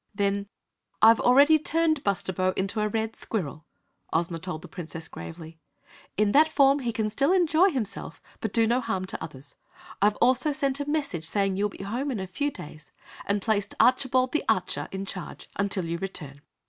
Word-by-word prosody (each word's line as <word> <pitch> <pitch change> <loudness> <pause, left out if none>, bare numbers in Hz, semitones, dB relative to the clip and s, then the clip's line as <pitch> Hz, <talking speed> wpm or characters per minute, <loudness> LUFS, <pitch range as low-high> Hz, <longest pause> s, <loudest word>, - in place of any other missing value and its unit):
Then: 200 0 0 0.5
"I've 225 +1 +7
already 285 +5 +6
turned 315 -1 +1
Bustabo 185 -2 0
into 195 +3 -1
a 210 - +1
red 220 +1 -2
Squirrel!" 160 -7 -4 0.5
Ozma 165 +1 -1
told 160 -2 -5
the - - -9
Princess, 165 -1 -7
gravely. 165 -1 -10 0.6
"In 210 0 +3
that 310 +5 +5
form 280 -2 +4
he 240 -3 -2 0.2
still 275 - +1
can 375 - +4
enjoy 340 +3 +4
himself, 235 - -4 0.2
but 220 - -3
do 230 0 +3
no 240 +3 +2
harm 185 -5 -2
to - - -5
others. 145 -3 -10 0.5
I've 205 +1 +4
also 255 +4 +3
sent 275 -1 -1
a 285 0 -3
message 280 - -2
saying 195 +2 0
you 200 +2 0
will 205 - -4
be - - -7
home 245 +8 -3
in 245 -6 -2
a 190 - -3
few 235 +11 -2
days, 150 - -11 0.4
and 200 -1 0
placed 205 -2 0
Archibald 255 0 +3
the 310 - 0
Archer - - 0
in 190 0 -4
charge 185 -2 -7 0.2
till 190 -3 -1
you 170 +1 -3
return!" 150 -7 -5
210 Hz, 185 wpm, -26 LUFS, 185-270 Hz, 0.6 s, I've